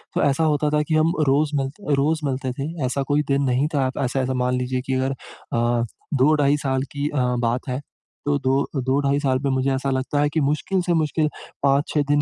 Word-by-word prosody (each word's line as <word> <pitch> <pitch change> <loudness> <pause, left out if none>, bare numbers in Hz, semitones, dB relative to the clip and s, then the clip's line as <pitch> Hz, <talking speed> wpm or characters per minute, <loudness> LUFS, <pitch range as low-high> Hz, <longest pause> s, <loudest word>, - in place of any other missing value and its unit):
तो - - +2
ऐसा 145 +3 +2
होता 150 -1 +2
था 150 0 +2
कि 160 - +1
हम 160 +2 +3
रोज़ 145 +3 +3
मिलते 145 +4 -2
रोज़ 155 +3 +1
मिलते 130 -1 -2
थे। 135 +1 -4 0.2
ऐसा 135 +2 -1
कोई 150 +1 +3
दिन 140 0 +2
नहीं 130 +2 +2
था 135 -2 +2
आप 130 - -3
ऐसा, 135 0 0
ऐसा 130 0 -1
मान 125 0 0
लीजिए 125 0 -1
कि 130 - 0
अगर 130 +1 0
अ, 120 -2 -2 0.3
2 140 +3 +4
ढाई 140 +1 +3
साल 135 -2 -1
की 145 +1 -1
अ, 145 - -4 0.2
बात 120 +2 -1
है, 125 +3 -2 0.4
तो 145 0 +2
दो 135 +1 0
दो-ढाई 140 +1 +2
साल 130 -3 +1
में - - +2
मुझे 130 +1 +1
ऐसा 135 +1 -1
लगता 130 +2 -1
है 145 - +2
कि 160 - +2
मुश्किल 150 +6 0
से 175 -1 0
मुश्किल 155 0 +1 0.4
5-6 140 +2 +2
दिन 145 0 +4
140 Hz, 225 wpm, -23 LUFS, 130-145 Hz, 0.4 s, 2